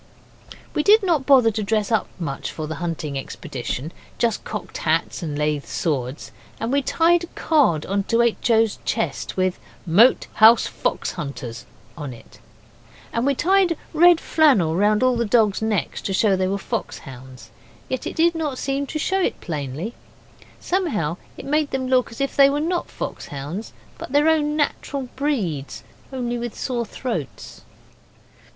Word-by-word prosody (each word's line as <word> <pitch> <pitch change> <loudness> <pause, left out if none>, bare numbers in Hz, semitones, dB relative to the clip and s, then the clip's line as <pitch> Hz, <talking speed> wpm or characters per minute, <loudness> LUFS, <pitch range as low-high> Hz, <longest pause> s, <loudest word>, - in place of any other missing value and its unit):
We - - +1
did 415 +6 +5
not 320 -8 +1
bother 255 -5 +6
to 215 0 -3
dress 215 +1 0
up 220 -4 +2
much 145 -6 -4
for 155 - -5
the 155 - -4
hunting 155 -5 -3
expedition 135 +3 -5 0.3
just 230 -2 0
cocked - - -6
hats - - 0
and 150 -4 -4
lath 150 -1 -1
swords; 135 -3 -2 0.3
and 225 +2 -2
we 280 +1 +3
tied 340 +5 +2
a - - -24
card 265 - +2
on 200 +1 0
to 230 +2 +3
H. 235 +1 0
O.'s 225 -2 +3
chest - - -2
with 185 -1 0 0.3
'Moat 205 +10 +5 0.2
House 225 +1 +8
Fox - - -2
Hunters' 125 -5 -7 0.3
on 145 -4 -6
it; 115 - -16 0.7
and 230 +3 0
we 280 - +2
tied 365 +1 +3 0.2
red 345 +1 +6
flannel 255 - +3
round 210 +5 +3
all 255 -1 +3
the 235 - +1
dogs' 215 -2 +2
necks 220 -4 -1
to 195 - -3
show 195 0 +3
they 185 0 0
were 195 +1 -1
fox 225 +3 -4
hounds. 130 -1 -12 0.4
Yet 260 - -3
it - - -5
did 335 +1 +3
not 305 -5 -3
seem 275 +1 -2
to 310 - -4
show 380 +5 0
it - - -1
plainly; 155 - -4 0.7
somehow 220 - -1 0.2
it - - -8
made 300 +1 +1
them 265 -1 -2
look 255 -1 +2
as 230 - -11
if 275 0 -1
they 275 -1 +7
were 285 +1 0
not 345 +3 -1
fox - - -6
hounds, 145 +10 -6 0.3
but - - -8
their 295 +2 +4
own 300 -2 +2
natural 280 -3 -2
breeds 210 - -2 0.3
only 240 -2 -3
with 240 -2 -5
sore 240 -3 -2
throats. 205 - -5
230 Hz, 170 wpm, -22 LUFS, -, 0.7 s, House